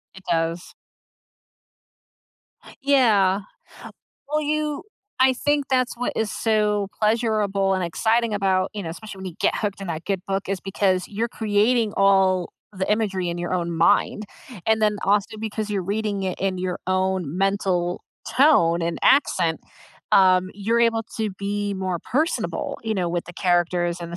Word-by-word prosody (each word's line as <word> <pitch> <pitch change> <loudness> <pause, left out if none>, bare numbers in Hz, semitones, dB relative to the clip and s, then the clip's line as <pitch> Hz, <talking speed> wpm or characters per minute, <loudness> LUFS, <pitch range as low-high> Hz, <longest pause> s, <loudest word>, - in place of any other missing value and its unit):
It 190 - -13
does. 165 +1 -1 2.1
Yeah. 215 -9 +3 0.9
Well, 305 +1 0
you 300 0 -1 0.4
I 260 0 +5
think 290 +1 0
that's 255 -2 +1
what 245 - -1
is 220 -3 0
so 210 -2 +1
pleasurable 210 -3 +1
and 185 -1 -1
exciting 225 +6 +1
about, 190 -2 +1
you 205 -2 -5
know, 165 - -5
especially 200 +3 -8
when 190 - -7
you 175 - -7
get - - +2
hooked 205 -2 -3
in - - -5
that 165 0 -5
good 195 -3 -1
book 195 0 -2
is 195 -2 -2
because 190 -2 0
you're 225 +3 -2
creating 220 +1 +1
all 190 -2 +3 0.2
the 190 +1 -3
imagery 195 -5 0
in 170 - -3
your 175 +1 -4
own 170 -1 -1
mind, 170 +5 +2 0.4
and 220 0 +3
then 210 -1 +2
also 205 +2 +1
because 215 -1 -4
you're 195 -2 -1
reading 205 +1 -2
it 185 -1 -3
in 190 -1 -1
your 180 0 -3
own 185 -4 0
mental 190 -3 0 0.3
tone 210 - +4
and 170 0 -2
accent, 170 - +3 0.5
um, 185 -1 +5
you're 225 +4 0
able 230 -1 +2 0.2
to 215 -2 -1
be 205 0 -2
more 185 -2 -2
personable, 305 - -2
you 220 -1 -1
know, 180 -3 -1
with 175 0 -2
the 175 - -9
characters 175 -1 +1
and 170 0 -7
the - - -4
195 Hz, 160 wpm, -23 LUFS, 185-220 Hz, 2.1 s, I